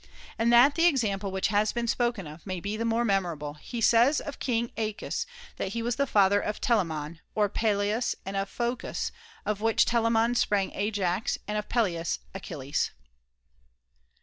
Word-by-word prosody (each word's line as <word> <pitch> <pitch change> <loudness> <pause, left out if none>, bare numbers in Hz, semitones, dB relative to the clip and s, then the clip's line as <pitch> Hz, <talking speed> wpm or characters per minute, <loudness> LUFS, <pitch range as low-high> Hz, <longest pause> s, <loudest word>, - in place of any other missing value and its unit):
And 230 +1 +3
that 245 +4 +7
the 335 +2 +2
example 210 - +1
which 190 0 0
has 210 +1 +2
been 235 0 -1
spoken 235 -4 0
of 155 +2 -10
may 185 -1 -3
be 200 +4 -3
the 230 +1 -2
more 230 +1 +1
memorable, 170 -8 -1
he 230 +10 -7
says 235 +6 +5
of 290 - -7
King 235 -2 0
^acus 215 -2 -3 0.3
that 195 - -3
he 230 - -2
was 240 +1 -1
the 280 0 +1
father 200 -2 +4
of 210 - -3
Telamon, 165 -8 0 0.2
ot 210 -1 +2
Peleus 215 +2 +1
and 195 +1 -4
of 195 0 -1
Phocus, 240 +1 -2 0.3
of 210 -1 -1
which 225 0 +3
Telamon 230 0 +2
sprang 205 -4 +1
Ajax, 200 -1 -1
and 210 - -2
of 210 0 -3
Peleus, 175 -8 0 0.2
Achilles. 145 -7 -2
210 Hz, 170 wpm, -28 LUFS, 195-235 Hz, 0.3 s, that